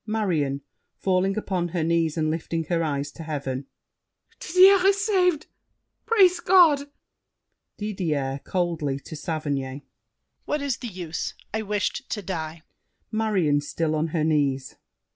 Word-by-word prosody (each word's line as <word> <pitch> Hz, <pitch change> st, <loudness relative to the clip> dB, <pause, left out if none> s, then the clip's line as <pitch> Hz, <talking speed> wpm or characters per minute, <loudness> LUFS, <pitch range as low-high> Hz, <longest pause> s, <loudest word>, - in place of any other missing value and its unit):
MARION 165 Hz, -11 st, 0 dB, 0.3 s
(falling 190 Hz, +1 st, +1 dB
upon 185 Hz, -4 st, -1 dB
her 170 Hz, -1 st, -2 dB
knees 165 Hz, -1 st, +1 dB
and 155 Hz, -1 st, +1 dB
lifting 165 Hz, 0 st, -2 dB
her 170 Hz, -2 st, +1 dB
eyes 145 Hz, -2 st, -2 dB
to 165 Hz, -, -11 dB
heaven). 140 Hz, -4 st, -4 dB, 0.7 s
Didier 370 Hz, +2 st, +6 dB
is 395 Hz, 0 st, +3 dB
saved! 360 Hz, -7 st, +2 dB, 0.6 s
Praise 375 Hz, -6 st, +5 dB
God! 335 Hz, -6 st, +5 dB, 0.9 s
DIDIER 155 Hz, -10 st, -2 dB
(coldly, 165 Hz, -7 st, -1 dB
to 160 Hz, -, -9 dB
Saverny). 145 Hz, -3 st, -3 dB, 0.6 s
What 295 Hz, -1 st, -1 dB
is 275 Hz, -4 st, -1 dB
the 245 Hz, -, -6 dB
use? 175 Hz, -5 st, -5 dB, 0.2 s
I 220 Hz, -, 0 dB
wished 210 Hz, +5 st, -2 dB
to 210 Hz, -, -4 dB
die. 160 Hz, -3 st, -5 dB, 0.5 s
MARION 195 Hz, -10 st, +1 dB
(still 155 Hz, +2 st, -2 dB
on 155 Hz, +1 st, 0 dB
her 160 Hz, -1 st, -1 dB
knees). 140 Hz, -4 st, 0 dB
170 Hz, 130 wpm, -25 LUFS, 150-220 Hz, 0.9 s, Didier